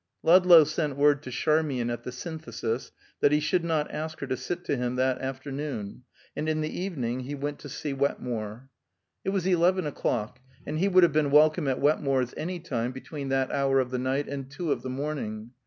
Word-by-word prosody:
Ludlow 175 -1 +8
sent 150 -2 -2
word 145 0 +4
to 130 - -8
Charmian 135 -2 +1
at 120 -1 -4
the 125 - -5
Synthesis 130 -4 -4 0.3
that 145 - +4
he 150 - +4
should 165 +3 +1
not 160 -3 0
ask 155 +1 -5
her - - -2
to 130 -1 -1
sit 175 +7 -5
to - - 0
him 125 -1 -2
that 130 0 +1
afternoon, 135 -4 -5 0.3
and 155 +2 -2
in 155 0 0
the 155 - -3
evening 130 -10 -2
he 135 +3 -5
went 145 +1 -4
to 145 - -9
see 145 +2 -4
Wetmore. 125 -3 -3 0.5
It - - -1
was 195 -2 -1
eleven 185 0 +3
o'clock, 125 -4 -2 0.3
and 155 +1 -3
he 190 - +3
would 185 -2 +5
have 165 -4 +4
been 150 -2 +2
welcome 150 0 +5
at 130 - 0
Wetmore's 135 -4 +1
any 175 +3 -4
time 125 -7 -2
between 135 +2 -6
that 135 -1 +1
hour 135 -1 +2
of 130 -1 -1
the 125 - -1
night 135 +3 -1
and 135 -1 -5
two 160 +2 -3
of - - 0
the 130 - -5
morning. 130 -5 -4
140 Hz, 205 wpm, -27 LUFS, 130-155 Hz, 0.5 s, Ludlow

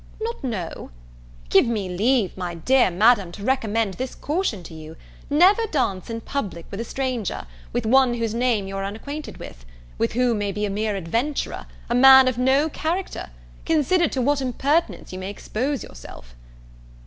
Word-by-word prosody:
not 455 -3 -4
know? 200 -10 -4 0.6
Give - - +5
me 215 -5 -1
leave, 210 +3 +1
my 180 -2 -4
dear 255 +8 +3
Madam, 200 0 +3
to 200 - -9
recommend 225 -4 0
this 255 +5 -5
caution 295 - -2
to 170 - -11
you: 160 0 -10 0.3
Never 375 +10 +4
dance 220 - -1
in 230 0 -4
public 195 - -4
with 200 - -4
a - - -2
stranger, 250 - -3 0.3
with - - -2
one 255 +1 +4
whose 230 -2 -2
name 230 -4 +1
you 195 - -6
are 195 - -3
unacquainted 280 +10 -6
with, - - -11 0.5
who 245 0 +2
may 205 -2 -1
be 210 +2 -2
a 200 - -3
mere 210 +1 -1
adventurer, 230 - -2 0.2
a 235 - -1
man 265 +1 +8
of 250 -1 0
no 265 +4 +3
character, 325 - -3 0.3
consider 325 +2 +2
to 260 -2 -2
what 285 +2 +1
impertinence 275 - -1
you 185 - -5
may 190 +1 -5
expose 250 +7 -3
yourself." - - -12
235 Hz, 170 wpm, -23 LUFS, 195-270 Hz, 0.6 s, man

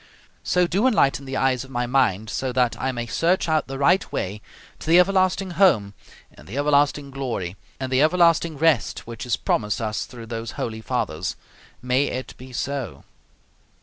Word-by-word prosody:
So 180 0 +2
do 195 +8 +2
enlighten 140 - +2
the 135 0 -4
eyes 130 -2 +1
of 130 - -13
my 125 -2 -1
mind 120 -5 +1
so 130 -1 -2
that 125 -1 +2
I 130 - 0
may 120 -2 -4
search 170 +10 +1
out 155 -1 +1
the 135 0 -5
right 175 +7 +2
way 100 +3 -3 0.4
to - - -10
the 170 - +7
everlasting 185 0 +2
home 150 - +3 0.4
and - - -16
the 115 - -6
everlasting 145 -1 +2
glory, 120 -10 -4 0.2
and 130 -1 -4
the 130 +1 +3
everlasting 170 -1 +3
rest 150 -8 +1
which 115 +1 -7
is 120 - +1
promised 105 -3 -1
us 110 -2 -3
through 120 -2 -10
those 115 0 -5
holy 110 -1 -4
fathers. 110 - -2 0.5
May 125 +3 +2
it 130 -3 -5
be 130 +1 -12
so! 140 +2 -4
130 Hz, 180 wpm, -23 LUFS, 120-160 Hz, 0.5 s, the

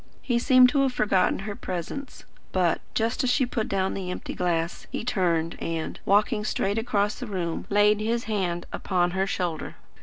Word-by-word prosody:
He 240 -2 +1
seemed 255 0 +7
to 280 +1 +2
have 265 -2 +2
forgotten 195 -5 +2
her 205 -1 -4
presence; 185 - -6 0.3
but, 180 -3 +1
just 225 +4 0
as 255 - +2
she 260 +1 +3
put 235 -3 -2
down 190 -1 0
the 185 -2 -4
empty 180 - -5
glass, 170 -1 -1
he - - -3
turned 170 -8 0
and, 165 -1 -3
walking 210 +2 +3
straight 205 0 0
across 210 -3 0
the 250 - -5
room, 175 -5 -3
laid 205 +1 +4
his 230 +2 0
hand 180 -5 -2
upon 175 -2 0
her 190 +1 0
shoulder. 175 -5 -3
200 Hz, 180 wpm, -26 LUFS, 180-230 Hz, 0.3 s, seemed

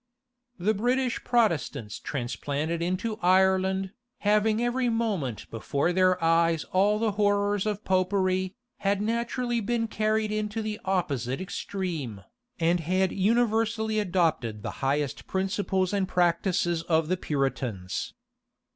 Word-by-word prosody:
The 200 +4 +1
British 245 +4 0
Protestants 170 - 0
transplanted 145 +6 -3
into 185 +5 -2
Ireland, 190 +1 +3 0.3
having 210 +1 +3
every 240 +1 +1
moment 205 - -1
before 140 +9 -1
their 185 0 +4
eyes 165 0 +3
all 200 +3 +3
the 220 0 +1
horrors 205 0 +1
of 210 -1 -2
Popery, 185 0 +1 0.2
had 200 0 0
naturally 235 +2 -1
been 230 +1 -1
carried 215 0 0
into 215 +1 -2
the 215 0 -4
opposite 140 -10 -1
extreme, 170 - -4 0.4
and 170 +1 +2
had 185 +3 +1
universally 220 +1 +1
adopted 160 - 0
the - - -3
highest 140 +1 -1
principles 190 0 0
and 195 -2 +1
practices 175 -1 +1
of 160 -1 +1
the 185 - +1
Puritans. 130 - -2
190 Hz, 120 wpm, -27 LUFS, 165-215 Hz, 0.4 s, their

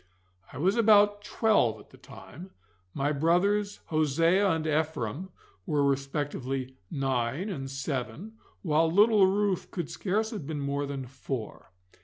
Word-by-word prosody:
I - - -9
was 190 - +1
about 205 -2 +5
twelve 205 - +2
at - - -17
the - - -16
time, 175 +8 -12 0.4
my 140 +6 -1
brothers 195 +7 +1
Hosea 165 +6 +2
and 160 -2 0
Ephraim 155 - -2 0.4
were 145 -1 +1
respectively 135 -1 -2 0.2
nine 135 - -1
and 135 -8 -5
seven, 135 - -4 0.3
while 160 -1 +2
little 205 +1 +5
Ruth 200 -1 0
could 175 -5 -5
scarce 215 +3 -1
have 200 - -6
been 155 -2 -4
more 140 0 -2
than 135 -2 -5
four. 130 -3 -7
155 Hz, 135 wpm, -28 LUFS, 135-195 Hz, 0.4 s, about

